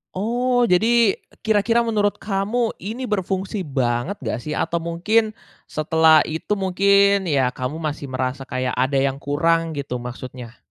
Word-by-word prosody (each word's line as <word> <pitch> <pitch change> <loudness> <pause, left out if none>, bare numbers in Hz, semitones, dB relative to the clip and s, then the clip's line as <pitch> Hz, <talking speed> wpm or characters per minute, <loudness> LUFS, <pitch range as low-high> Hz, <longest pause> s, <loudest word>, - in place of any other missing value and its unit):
Oh, 245 +5 +1
jadi, 225 +2 +3 0.2
kira-kira 220 +2 +2
menurut 210 -3 +1
kamu, 215 +4 -1
ini 225 +6 -5
berfungsi 195 -2 -2
banget 130 +5 -1
nggak, 115 0 -2
sih? 150 +5 -5
Atau 170 - -1
mungkin, 215 +7 0 0.3
setelah 160 0 +4
itu 160 +6 -3
mungkin, 200 0 +3
ya 135 -5 +2
kamu 130 +4 -4
masih 150 -2 -4
merasa 130 +1 -3
kayak 130 0 -2
ada 130 +2 +1
yang 135 0 +1
kurang 165 +3 0
gitu 135 -3 -4
maksudnya? 125 -1 -8
170 Hz, 140 wpm, -21 LUFS, 135-205 Hz, 0.3 s, setelah